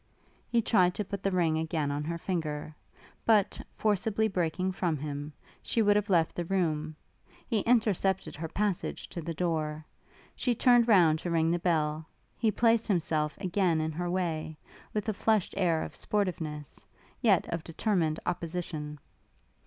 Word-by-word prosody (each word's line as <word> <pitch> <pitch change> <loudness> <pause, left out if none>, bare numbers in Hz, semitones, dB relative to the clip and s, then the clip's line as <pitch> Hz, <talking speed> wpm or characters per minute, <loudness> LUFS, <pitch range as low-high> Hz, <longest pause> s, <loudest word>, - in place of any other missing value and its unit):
He 235 -1 +2
tried 180 -5 +3
to 210 - -2
put 200 +1 -5
the 195 - +1
ring 170 -4 +1
again 160 -3 -1
on 145 +1 -2
her 170 +1 -2
finger; 155 -4 -3 0.5
but, 215 -4 +3
forcibly 220 +1 +1
breaking 185 -1 -1
from 175 -4 -1
him, 145 +1 -5 0.3
she 230 - +1
would 205 0 +4
have 205 0 +1
left 165 -4 +3
the 175 - -3
room: 155 -4 -1 0.5
he 225 - 0
intercepted 205 -4 +1
her 160 +2 -4
passage 200 +2 -2
to 170 - -6
the 165 +1 -5
door. 155 -3 -1 0.5
She 245 -2 0
turned 240 0 +5
round 170 -8 +5
to 175 - -4
ring 165 -1 +2
the 175 - +1
bell: 155 -2 0 0.3
he 225 - +3
placed 230 +1 +3
himself 155 -6 0
again 185 -3 +1
in 155 0 -1
her 175 +3 -3
way, 165 -4 -2 0.3
with 210 0 -2
a 215 - +1
flushed 215 -1 +1
air 170 -5 +2
of - - -7
sportiveness, 165 -8 -3 0.4
yet 205 -8 +4
of 165 -1 -3
determined 165 -2 0
opposition. 165 -3 -4
175 Hz, 160 wpm, -29 LUFS, 160-200 Hz, 0.5 s, turned